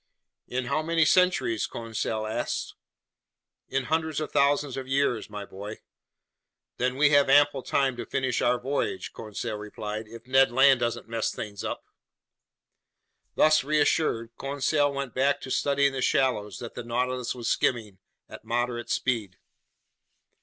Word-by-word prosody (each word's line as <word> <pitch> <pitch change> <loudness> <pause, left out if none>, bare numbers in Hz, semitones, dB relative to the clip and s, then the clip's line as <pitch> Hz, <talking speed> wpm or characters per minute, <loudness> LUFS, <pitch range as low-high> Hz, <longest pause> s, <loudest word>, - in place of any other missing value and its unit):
"In 125 0 -2
how 155 +5 0
many 165 0 +2
centuries?" 180 -11 +2
Conseil 110 -1 -3
asked. 110 +2 -3 1.0
"In 135 0 0
hundreds 160 +1 -1
of 155 - -4
thousands 140 -1 +2
of 130 -1 -5
years, 135 -5 0
my 105 -1 -6
boy." 100 +3 -8 1.0
"Then 125 +1 0
we 145 +1 +4
have 145 -2 +5
ample 145 0 +5
time 135 0 +1
to - - -5
finish 130 -2 -1
our 120 0 +2
voyage," 130 -6 -2
Conseil 105 0 -5
replied, 105 +1 -6
"if 115 +1 -12
Ned 135 0 +4
Land 135 +1 +5
doesn't 120 -1 -2
mess 115 -1 -1
things 100 -1 -6
up!" - - -4 1.5
Thus 155 -1 +4
reassured, 145 -5 +1
Conseil 145 +1 +1
went 140 -4 -4
back 140 +2 +2
to 130 - -7
studying 140 0 +2
the 135 - -3
shallows 125 -7 +1
that 120 - -8
the 120 - -6
Nautilus 125 +1 -2
was 120 -2 -5
skimming 110 -8 0 0.3
at - - -11
moderate 120 0 -2
speed. 110 -7 -1
130 Hz, 145 wpm, -27 LUFS, 115-140 Hz, 1.5 s, have